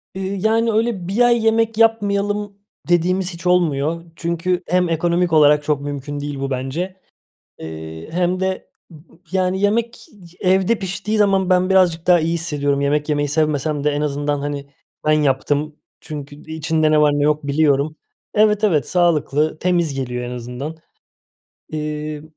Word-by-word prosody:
Iıı, 190 +1 -3
yani, 225 +3 +2
öyle 220 -5 -1
1 200 +6 0
ay 240 -2 +4
yemek 225 0 +2
yapmayalım 205 -2 +1 0.3
dediğimiz 180 +2 +1
hiç 170 +1 -6
olmuyor. 165 -2 +1
Çünkü 175 +2 -1
hem 180 +1 +2
ekonomik 170 +1 +1
olarak 150 -1 +5
çok 145 -1 0
mümkün 145 0 -5
değil 145 -1 -5
bu 135 0 -2
bence, 145 +9 -3 0.7
ııı, 80 0 -8
hem 180 +2 0
de 190 0 -2 0.2
m 165 - -13
m 150 - -16 0.3
yani, 185 0 0
yemek 225 +3 0 0.3
evde 190 +4 +2
piştiği 200 +2 -3
zaman 195 -2 +2
ben 185 +1 +3
birazcık 180 -3 +3
daha 175 -1 +5
iyi 165 +1 0
hissediyorum. 145 -4 -1
Yemek 145 +2 0
yemeyi 145 -1 0
sevmesem 150 -1 0
de 150 - +3
en 145 0 -2
azından, 145 0 -1
hani, 140 -1 -5 0.4
ben 155 - +4
yaptım. 145 +1 +1 0.3
Çünkü 145 -3 -8
i 160 +2 -10
içinde 160 0 +1
ne 155 0 +4
var, 150 -1 +4
ne 145 0 0
yok, 150 0 +1
biliyorum. 145 +1 +1 0.4
Evet, 210 0 +3
evet, 155 - +2
sağlıklı, 155 -3 +1
temiz 175 -4 +1
geliyor 125 -2 -3
en 120 - -5
azından. 125 +6 -6 0.9
Eee, 150 -1 -4
160 Hz, 160 wpm, -20 LUFS, 145-190 Hz, 0.9 s, olarak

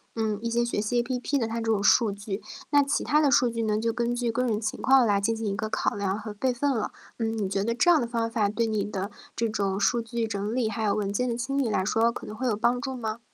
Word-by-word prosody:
嗯， 215 -2 -1
一 235 - -2
些 235 +1 +1
学 220 -3 -1
习 240 +3 +1
APP 255 +3 -1
的 230 -4 0
它 225 - -4
这 225 0 0
种 205 -2 +1
数 215 +1 +4
据。 200 0 -5 0.3
那 285 -1 +5
其 275 - -1
他 300 +1 +3
的 285 -3 +3
数 255 -3 +4
据 230 0 -3
呢， 215 -1 +1
就 225 +1 0
根 240 0 0
据 240 -1 -1
个 250 +2 0
人 220 -4 0
情 215 -1 -3
况 265 -2 +5
来 200 -2 +2
进 225 +2 +1
行 220 -1 -3
一 195 - -1
个 215 +1 -3
考 - - 0
量 200 0 -1
和 215 -2 -7
备 255 +5 0
份 275 +4 0
了。 225 -5 -1 0.3
嗯， 225 0 -1
你 200 -3 -1
觉 195 +1 -1
得 230 +2 0
这 245 +9 +3
样 320 -6 +6
的 - - 0
方 230 -1 -1
法 210 -3 +1
对 230 +2 0
你 215 -2 0
的 200 -1 -4 0.2
这 230 - 0
种 200 -2 -1
数 235 +3 +2
据 230 0 -3
整 205 +1 -3
理， 240 -3 +1
还 220 +1 -3
有 205 - +2
文 200 -1 -1
件 250 +3 0
的 235 - -2
清 275 +3 -2
理 255 -5 +1
来 190 -2 0
说， 230 +2 +2
可 - - -8
能 215 - -7
会 255 +2 -2
有 210 -3 +1
帮 245 +2 +1
助 265 -2 -3
吗？ 220 -1 -4
225 Hz, 330 characters per minute, -26 LUFS, 210-240 Hz, 0.3 s, 样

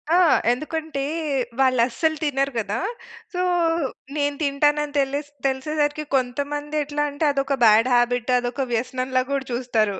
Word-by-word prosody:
ఆ! - - +6 0.3
ఎందుకంటే, 305 +2 -3 0.6
వాళ్ళస్సలు 260 +5 +2
తినరు 275 -1 0
గదా! 210 0 -1 0.6
సో, 360 - -1 0.8
నేను 285 0 0
తింటానని 295 +1 +1
తెలిస్ 280 +2 -1 0.2
తెలిసేసరికి 295 +3 -1
కొంతమందెట్లా 290 +3 -1
అంటే, 285 +2 -1
అదొక 275 0 -1
బ్యాడ్ 220 +3 +5
హాబిట్, 245 0 +1
అదొక 245 +2 -2
వ్యసనంలా 255 +2 0
గూడా 275 -1 -1
చూస్తారు. 225 -5 0
275 Hz, 115 wpm, -23 LUFS, 250-295 Hz, 0.8 s, ఆ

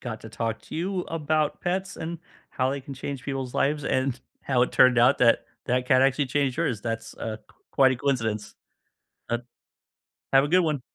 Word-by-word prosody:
got 110 -3 -6
to 110 - -8
talk 110 0 -3
to - - -10
you 185 +2 -1
about 155 -2 0
pets 190 +2 -2
and, 165 +1 -5 0.3
how 130 +1 0
they 140 0 -3
can 135 +1 -9
change 135 0 -5
people's 135 -3 -4
lives 145 0 0
and 130 -1 0 0.2
how 125 -3 +1
it - - 0
turned 130 -1 +6
out 120 +1 +5
that, 115 -2 +4 0.2
that 125 0 0
cat 130 0 +5
actually 135 +2 +3
changed 135 -1 0
yours. 110 -6 -1
That's, 115 0 -4
uh, 110 -1 -4 0.3
quite 130 -1 +4
a - - -2
coincidence. 115 -6 -1 0.8
Uh 120 - +1 0.9
Have 135 0 +6
a - - 0
good 180 +4 +4
one. 150 -6 -1
130 Hz, 190 wpm, -26 LUFS, 120-145 Hz, 0.9 s, turned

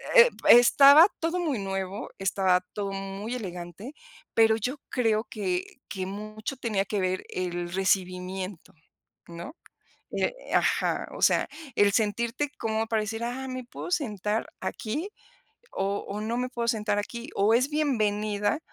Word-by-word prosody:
eh, - - +9 0.2
estaba 280 +6 +9
todo 330 +2 -1
muy 305 -9 -1
nuevo, 195 0 -4
estaba 190 -1 +2
todo 200 -1 -3
muy 195 +4 -5
elegante, 185 - -7 0.4
pero 225 -1 +5
yo 250 +6 -3
creo 225 -3 +1
que 185 -4 -3
que 190 -2 -4
mucho 215 +5 -6
tenía 215 -6 -1
que 205 0 -2
ver 185 0 -1
el 175 -1 -3
recibimiento, 185 -1 -1 0.5
¿no?, 170 - -8 0.6
eh, - - 0 0.2
ajá, - - +1
o - - -8
sea, - - +4 0.3
el 205 -1 +4
sentirte 230 +7 0
como 220 0 -1
pareciera: 225 +4 -2
"Ah, - - -6
¿me 255 -1 -5
puedo 245 - -8
sentar 215 - -1
aquí, 300 - -3 0.6
o 195 +1 -2
o 205 - -4
no 225 +2 -2
me 250 0 -1
puedo 235 -2 -3
sentar 210 -3 0
aquí?", 235 +3 -6
o, 205 +3 +3
¿es 255 +4 +3
bienvenida 215 -5 0
215 Hz, 140 wpm, -27 LUFS, 195-245 Hz, 0.6 s, eh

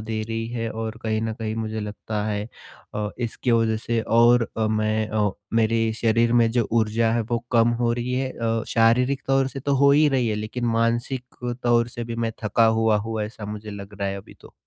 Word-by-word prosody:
दे 110 0 -3
रही 115 0 -2
है 115 -1 -3
और 110 0 -4
कहीं 110 -1 0
न 110 0 -2
कहीं 110 -1 -4
मुझे 110 -1 -3
लगता 105 0 -4
है 105 -1 -2 0.5
अ, 105 0 -2
इसकी 120 +1 -2
वजह 115 -1 +2
से 115 +1 -1
और 120 +1 +4
अ, 110 - +1
मैं 110 0 0
अ, 105 -2 +1 0.2
मेरे 115 0 +2
शरीर 115 +1 +3
में 120 -1 +4
जो 120 -2 +1
ऊर्जा 115 0 +2
है, 120 - +1
वो 115 +2 -1
कम 115 -1 +5
हो 120 -1 +2
रही 120 +1 -2
है 130 0 -1
अ, 115 -1 -1
शारीरिक 125 +4 +3
तौर 135 0 +2
से 135 - -7
तो 140 +1 0
हो 140 +1 +5
ही 150 +1 +5
रही 130 -4 +1
है, 110 - 0
लेकिन 110 +4 -4
मानसिक 120 +2 -1
तौर 120 -1 +3
से 120 0 -6
भी 115 0 -5
मैं 115 -1 -1
थका 110 +2 +3
हुआ 110 -1 +3
हूँ 110 -1 -3
ऐसा 105 0 -7
मुझे 105 0 -6
लग 100 0 -9
रहा 100 - 0
है 95 - -3
अभी 95 - -14
तो। - - -15
115 Hz, 220 wpm, -24 LUFS, 110-120 Hz, 0.5 s, कम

